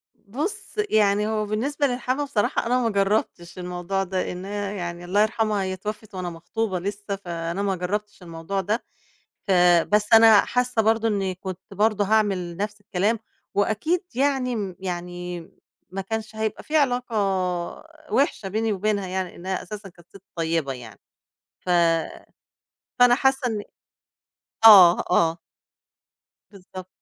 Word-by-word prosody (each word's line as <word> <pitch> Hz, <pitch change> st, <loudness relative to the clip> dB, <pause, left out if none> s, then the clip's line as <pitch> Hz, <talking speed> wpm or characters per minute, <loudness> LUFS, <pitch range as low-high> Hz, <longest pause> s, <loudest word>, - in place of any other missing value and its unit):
بُص، 275 Hz, -, -5 dB
يعني 210 Hz, -1 st, +3 dB
هو 215 Hz, -1 st, -1 dB
بالنسبة 275 Hz, +8 st, 0 dB
للحما 255 Hz, +3 st, -1 dB
بصراحة 255 Hz, -7 st, 0 dB
أنا 250 Hz, +2 st, +2 dB
ما 230 Hz, -, +1 dB
جربتش 195 Hz, -4 st, -1 dB
الموضوع 180 Hz, +2 st, -2 dB
ده، 185 Hz, 0 st, -2 dB
إن 180 Hz, +1 st, -7 dB
هي 205 Hz, 0 st, -4 dB
يعني 175 Hz, -1 st, -5 dB
الله 200 Hz, +4 st, +2 dB
يرحمها 215 Hz, -2 st, +1 dB
هي 190 Hz, 0 st, -2 dB
اتوفت 210 Hz, +2 st, -7 dB
وأنا 180 Hz, -1 st, -3 dB
مخطوبة 185 Hz, +4 st, -3 dB
لسّه، 200 Hz, +2 st, -4 dB
فأنا 170 Hz, -1 st, -4 dB
ما 195 Hz, -1 st, 0 dB
جربتش 205 Hz, +3 st, -4 dB
الموضوع 170 Hz, +4 st, -4 dB
ده، 215 Hz, +5 st, -1 dB, 0.6 s
ف -, -, +1 dB, 0.4 s
بس 210 Hz, +1 st, +2 dB
أنا 225 Hz, -2 st, +8 dB
حاسّة 250 Hz, -2 st, +1 dB
برضه 225 Hz, +1 st, +2 dB
إنّي 195 Hz, -3 st, -1 dB
كنت 185 Hz, -1 st, -7 dB
برضه 210 Hz, +1 st, +2 dB
هاعمل 195 Hz, -5 st, +1 dB
نفس 205 Hz, +1 st, -4 dB
الكلام، 205 Hz, +2 st, 0 dB, 0.3 s
وأكيد 220 Hz, -, 0 dB
يعني 265 Hz, -2 st, +1 dB
م 195 Hz, -4 st, -4 dB
يعني 180 Hz, -1 st, -5 dB, 0.5 s
ما 190 Hz, +2 st, -4 dB
كانش 220 Hz, +2 st, -5 dB
هيبقى 220 Hz, -1 st, -3 dB
في 310 Hz, -, 0 dB
علاقة 250 Hz, -4 st, 0 dB, 1.0 s
وحشة 265 Hz, -7 st, +1 dB
بيني 220 Hz, +1 st, 0 dB
وبينها 200 Hz, 0 st, -1 dB
يعني، 185 Hz, -1 st, -3 dB
إنها 185 Hz, +2 st, -4 dB
أساسًا 210 Hz, -2 st, -8 dB
كانت 175 Hz, -1 st, -21 dB
سِت 195 Hz, -1 st, -14 dB
طيبة 165 Hz, -4 st, -1 dB
يعني، 115 Hz, -5 st, -11 dB, 0.6 s
ف -, -, -12 dB, 1.3 s
فأنا 245 Hz, 0 st, +7 dB
حاسّة 265 Hz, -1 st, +1 dB
إن 215 Hz, -3 st, -2 dB, 1.0 s
آه، 190 Hz, -6 st, +9 dB
آه. 165 Hz, -1 st, +3 dB, 1.1 s
بالضبط. 185 Hz, -2 st, -11 dB
205 Hz, 140 wpm, -24 LUFS, 185-220 Hz, 1.3 s, آه